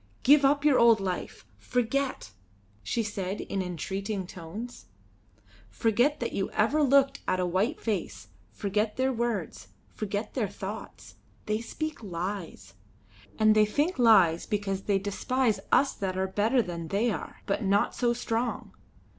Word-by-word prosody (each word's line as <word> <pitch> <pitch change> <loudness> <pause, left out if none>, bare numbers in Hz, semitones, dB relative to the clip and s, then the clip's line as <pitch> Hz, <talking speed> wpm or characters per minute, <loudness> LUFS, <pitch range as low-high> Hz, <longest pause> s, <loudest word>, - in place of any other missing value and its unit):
"Give 285 +2 +6
up 285 +1 +3
your 285 -4 +5
old 230 -2 +6
life! 185 -2 -4
Forget!" 250 - -1 0.5
she 230 - -1
said 200 -2 -4
in 195 - -3
entreating 190 +3 -4
tones. 190 +8 -8 0.8
"Forget 240 +7 +1
that 235 - -3
you 195 - -1
ever 250 +9 +2
looked 275 -1 +3
at 185 - +1
a 180 - +1
white 195 - 0
face; 210 -5 -3 0.2
forget 210 +1 -1
their 260 0 +1
words; 230 -7 -3 0.3
forget 210 0 -4
their 225 -7 -1
thoughts. 200 +4 -8 0.3
They 215 +1 -1
speak 310 +5 -5
lies. 175 - -5 0.6
And 215 -1 +5
they 215 -1 +4
think 290 - 0
lies 190 -9 +5
because 195 -2 -2
they 200 -2 +2
despise 220 +4 0
us 275 - +4
that 185 -2 -3
are 190 - +1
better 220 +6 +2
than 170 -3 -6
they 210 +7 +1
are, 170 - -7
but 200 - -1
not 200 +1 +2
so 240 -1 +1
strong. 235 0 -2
215 Hz, 145 wpm, -28 LUFS, 195-245 Hz, 0.8 s, Give